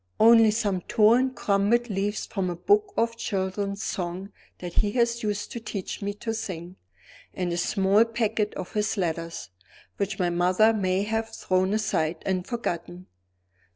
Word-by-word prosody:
Only 225 0 +7
some 205 -4 0
torn 235 +6 +4
crumpled 215 +2 +1
leaves 205 +2 -1
from 190 -3 -2
a 175 - -3
book 410 - +2
of 230 0 +1
children's 200 0 -2
songs 180 +2 -4 0.3
that 175 -1 -7
he 210 - +2
used 235 +1 +1 0.3
to 235 - -5
teach 215 -4 -5
me 200 0 -2
to 225 +2 -4
sing; 180 -4 -6 0.6
and 180 -2 -2
a - - -2
small 195 +4 +3
packet 225 -2 -1
of 185 - -6
his 210 +1 0
letters, 165 - -3 0.5
which 200 0 -2
my 180 -2 +1
mother 185 +6 +3
may 190 -2 0
have 225 +1 -2
thrown 185 -3 0
aside 175 -7 -1
and 185 -1 -1
forgotten. 180 -6 -4
200 Hz, 155 wpm, -26 LUFS, 185-225 Hz, 0.6 s, Only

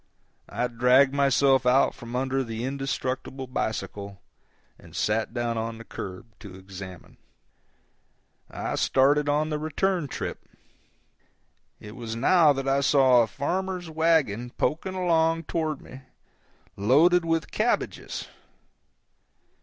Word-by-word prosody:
I 125 - -1
dragged 125 +3 +4
myself 135 -1 +3
out 125 +2 +3
from 120 +1 -9
under 135 +1 0
the 115 -1 -5
indestructible 135 0 -3
bicycle 100 -5 -4 0.6
and - - -15
sat 110 +1 0
down 120 -2 -2
on 115 0 -4
the 115 - -10
curb 100 0 -8
to 100 -4 -11
examine. 95 -1 -11 1.3
I - - -4
started 145 +2 +3
on 150 +2 +1
the 150 - -1
return 165 +2 -1
trip. - - -6 1.3
It 105 +1 -11
was 115 -3 -6
now 155 +6 +5
that 135 -1 -2
I 135 +1 +2
saw 135 -3 +5
a 115 - +1
farmer's 180 - -3
wagon 155 -8 +1
poking 160 +10 -2
along 165 -2 +2
down - - -17
toward 155 -2 -2
me, 130 +1 -12 0.7
loaded 155 - +4
with 165 -1 -1
cabbages. 225 +3 -2
135 Hz, 120 wpm, -26 LUFS, 115-155 Hz, 1.3 s, now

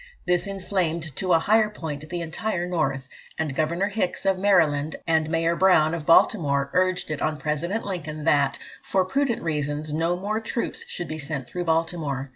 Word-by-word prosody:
This 180 +2 +1
inflamed 175 -6 -2
to 185 -1 -1
a - - +7
higher 215 +5 +3
point 155 -7 -6
the 175 0 -3
entire 175 +2 -2
North; 155 -7 -1 0.3
and 160 -3 -2
Governor 170 +7 0
Hicks, 200 -3 -2
of 190 -1 +2
Maryland, 155 -7 +3
and 160 -2 +2
Mayor 165 +1 +1
Brown, 165 -4 +4
of 165 -3 -4
Baltimore, 140 -6 +4
urged 185 -2 +1
it 150 - -3
on 155 -1 0
President 155 +8 -2
Lincoln 155 -6 -5
that, 145 -3 +3 0.2
"for 190 -1 +1
prudential 245 0 0
reasons," 150 -1 -2
no 165 +3 0
more 210 +4 -2
troops 230 +1 -3
should 175 - -5
be 155 +1 -5
sent 140 -3 -4
through 180 -1 -4
Baltimore. 160 -5 -1
165 Hz, 175 wpm, -25 LUFS, 150-185 Hz, 0.3 s, a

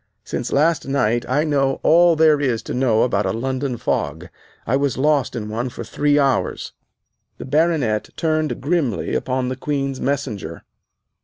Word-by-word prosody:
Since - - -4
last 155 +1 +2
night 120 -3 0
I 145 +4 +2
know 140 -3 +1
all 170 +1 +5
that 160 - +2
there 150 -2 +5
is 125 -5 0
to - - -5
know 125 -3 +2
about 105 -5 0
a - - 0
London 130 +2 -2
fog. 80 -3 -2 0.4
I 125 - +1
was 140 -2 0
lost 145 -1 +1
in 110 -3 -4
one 115 +4 -3
for 130 - -7
three 145 0 +1
hours." 140 -2 0 0.6
The - - -8
Baronet 140 -7 +1
turned 155 -1 -1
grimly 140 - -1
upon 130 -1 -1
the 130 - -3
Queen's 135 0 -3
Messenger. 120 - -3
135 Hz, 165 wpm, -20 LUFS, 120-145 Hz, 0.6 s, all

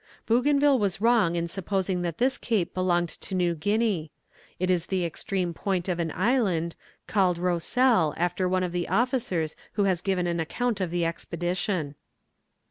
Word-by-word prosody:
Bougainville 280 +3 +3
was 195 -3 0
wrong 220 -6 +3
in 170 0 -1
supposing 190 0 -1
that 170 -2 -3
this 260 +2 +1
cape 210 -7 -1
belonged 175 -2 +1
to 190 - -6
New 175 -2 +2
Guinea; 205 -1 0 0.5
it 185 +1 +1
is 175 -2 0
the 185 -2 0
extreme 175 +1 -2
point 185 0 -2
of 175 -2 -1
an 165 -2 -1
island, 185 -6 +1 0.3
called 185 -4 +2
Rossel 180 - +2
after 180 +2 0
one 185 0 +1
of 180 - -2
the 175 0 -2
officers 235 - 0 0.2
who 205 - +1
has 185 -3 +1
given 185 -2 0
an 170 -1 -1
account 220 +6 -1
of 185 - 0
the 170 0 0
expedition. 175 -1 -2
180 Hz, 165 wpm, -26 LUFS, 170-205 Hz, 0.5 s, Bougainville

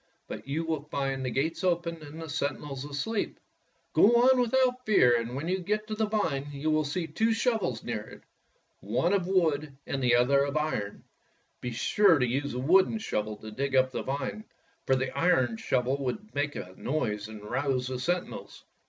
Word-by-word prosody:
But - - -8
you 155 +4 -2
will 160 -3 -1
find 135 -2 -2
the 130 - -1
gates 160 - -1
open 170 -2 0
and 150 +1 -10
the 165 - -6
sen 145 -2 -1
tinels 140 -1 -7
asleep. 205 +10 -2 0.5
Go 230 +4 +6
on 260 0 +6
without 250 +1 +2
fear, 125 - +5
and 120 +1 -2
when 145 +5 -3
you 185 +1 0
get 210 +4 -1
to 215 - -5
the 215 0 0
vine 160 -10 -1
you 145 +2 -1
will 155 0 +2
see 165 +4 -2
two 220 +9 +1
shovels 225 -5 0
near 115 -3 -2
it, 105 - -13 0.6
one 120 - 0
of 185 -3 +1
wood 155 -6 +1
and 135 - -3
the 125 -2 +4
other 140 +3 +4
of 140 +1 -1
iron. 150 -10 -2 0.6
Be 125 - -3
sure 165 - +4
to 125 - +2
use 135 +3 -1
the - - -3
wooden 185 - +4
shovel 110 - -2
to 110 +1 -10
dig 135 +4 -2
up 130 0 +4
the - - -3
vine, 140 +10 -3 0.4
for 130 - +4
the 130 0 -2
iron 130 -10 +2
shovel 130 +3 0
would 210 +12 -4
make 145 0 -1
a 90 - -7
noise 105 -7 -2
and 110 -1 -10
rouse 130 +3 -1
the 130 0 -3
sentinels. 175 +6 -3
145 Hz, 195 wpm, -29 LUFS, 130-180 Hz, 0.6 s, Go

